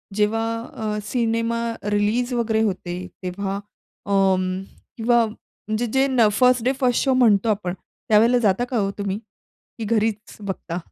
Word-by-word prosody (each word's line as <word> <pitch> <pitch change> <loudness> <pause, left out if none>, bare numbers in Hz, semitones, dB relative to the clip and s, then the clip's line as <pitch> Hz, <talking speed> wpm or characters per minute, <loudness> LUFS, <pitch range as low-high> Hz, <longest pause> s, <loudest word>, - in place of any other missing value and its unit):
जेव्हा 215 +2 +1 0.3
अ, 215 -1 -2
cinema 230 0 0 0.3
release 215 +5 +1
वगैरे 225 -2 +1
होते, 180 -4 -2 0.3
तेव्हा 195 +2 -3 0.5
अं, 190 -2 +2 0.4
किंवा 235 0 +3
म्हणजे 215 +1 -5
जे 265 0 +4
न 245 -4 +4
फर्स्ट 250 +1 +4
डे 260 - +3
फर्स्ट 250 -3 +2
शो 265 -2 +2
म्हणतो 225 -4 +4
आपण, 200 -4 -1 0.4
त्यावेळेला 225 +3 +5
जाता 195 +5 +2
का 250 - -1
हो 200 -2 +1
तुम्ही? 200 0 -2 0.6
की 225 - -4
घरीच 215 -1 -1
बघता? 190 -4 -4
220 Hz, 145 wpm, -22 LUFS, 200-235 Hz, 0.6 s, त्यावेळेला